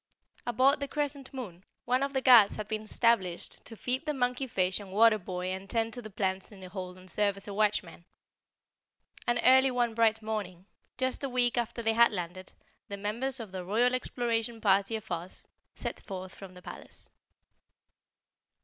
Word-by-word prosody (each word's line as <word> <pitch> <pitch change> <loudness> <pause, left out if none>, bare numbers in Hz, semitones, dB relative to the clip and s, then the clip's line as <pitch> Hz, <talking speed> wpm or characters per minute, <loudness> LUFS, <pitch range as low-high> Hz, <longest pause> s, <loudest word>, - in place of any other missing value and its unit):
Aboard 260 +5 +3
the 280 - -3
Crescent 280 -2 -3
Moon 200 -10 -7 0.2
one 250 +2 +2
of 275 0 -1
the 265 -1 0
Guards 240 -6 +8
had 215 -1 -5
been 215 -1 -2
established 215 -5 0
to 225 - -9
feed 255 +7 -2
the 300 - 0
monkey 250 +1 0
fish 185 -4 0
and 200 -2 -10
water 215 +2 +5
boy 180 -1 -4
and 190 +1 -7
tend 225 -1 0
to 245 - -5
the 215 - -9
plants 190 -1 -2
in 200 - -13
the 185 -1 -9
hold 185 -1 -6
and 185 0 -15
serve 200 +1 +1
as 200 - -9
watchman. 205 -3 -1 1.2
And 240 0 +2
early 260 +1 +7
one 245 -2 0
bright 225 -1 +2
morning, 200 -5 -4 0.3
just 260 +2 -1
a 275 - -1
week 245 -1 +2
after 235 -1 -2
they 225 0 +3
had 235 +1 +6
landed, 180 -1 -5 0.4
the 200 -2 -6
members 235 +6 -1
of 220 -5 -7
the 185 -1 -5
Royal 230 +7 +2
Exploration 235 -2 -1
Party 200 +1 +2
of 220 -2 -7
Oz 175 +1 -6 0.3
set - - -4
forth 185 -2 -7
from 190 -2 -11
the 180 - -13
palace. - - -9
220 Hz, 185 wpm, -30 LUFS, 190-245 Hz, 1.2 s, Guards